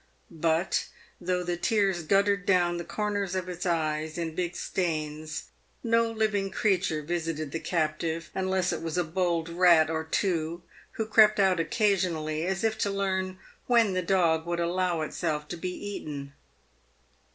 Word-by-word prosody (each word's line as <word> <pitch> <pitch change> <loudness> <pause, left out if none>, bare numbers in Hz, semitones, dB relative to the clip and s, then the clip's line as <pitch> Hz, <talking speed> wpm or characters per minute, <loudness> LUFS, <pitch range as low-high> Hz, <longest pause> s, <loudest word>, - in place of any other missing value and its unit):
But, 165 +2 0 0.3
though 180 0 0
the 175 0 -2
tears 195 -2 +1
guttered 200 +4 +2
down 175 -2 +3
the 170 - -4
corners 205 -1 -2
of 185 -1 -2
its 180 +1 -4
eyes 155 -2 -1
in 165 -2 -3
big 175 +1 -2
stains, 155 -3 -3 0.4
no 230 -1 +3
living 215 -3 0
creature 185 -8 0
visited 160 -2 -3
the 165 - -3
captive, 160 0 -2
unless 190 -1 0
it - - -4
was 165 +1 -3
a 180 - +3
bold 170 0 0
rat 170 -2 +5
or 160 0 -1
two, 170 0 -1 0.3
who 220 - -2
crept 215 -1 +5
out 190 -3 +4
occasionally 170 -5 0
as 190 +2 -1
if 220 -1 0
to 200 - +1
learn 190 -1 -1 0.3
when 230 -5 +4
the 185 - 0
dog 170 -3 +2
would 170 0 -1
allow 175 -1 0
itself 150 -1 -2
to - - -4
be 180 +2 -4
eaten. 150 -8 -6
175 Hz, 155 wpm, -28 LUFS, 160-195 Hz, 0.4 s, rat